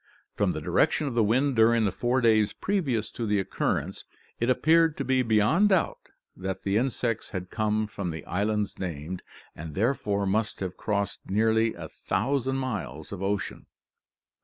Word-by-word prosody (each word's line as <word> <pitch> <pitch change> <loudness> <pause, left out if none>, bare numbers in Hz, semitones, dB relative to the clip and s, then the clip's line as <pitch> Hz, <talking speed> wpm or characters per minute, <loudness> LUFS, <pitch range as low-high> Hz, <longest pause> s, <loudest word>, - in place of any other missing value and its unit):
From - - +1
the - - -4
direction 155 - +2
of 135 - -2
the 115 -1 +3
wind 130 +6 +2
during 115 0 +4
the 100 - +1
four 125 +7 0
days 110 -3 +3
previous 135 - -1
to 115 - -4
the 105 -1 +2
occurrence, 95 - -2 0.4
it 120 - +1
appeared 160 +4 +4
to 140 - -2
be 130 -1 +2
beyond 115 - +3
doubt 190 -4 +1 0.4
that 95 0 -5
the 100 0 0
insects 120 -1 -1
had 90 -2 -6
come 110 -1 0
from 100 -3 -5
the 80 -2 -6
islands 105 +1 -1
named, 90 0 -4 0.3
and 80 -1 -8
therefore 105 -3 0
must 105 +3 0
have 95 -2 -4
crossed 100 -2 -2
nearly 110 +2 +2
a 85 -2 -7
thousand 130 - -1
miles 80 - -4
of 100 -2 -6
ocean!" 100 -2 -3
110 Hz, 165 wpm, -27 LUFS, 95-125 Hz, 0.4 s, during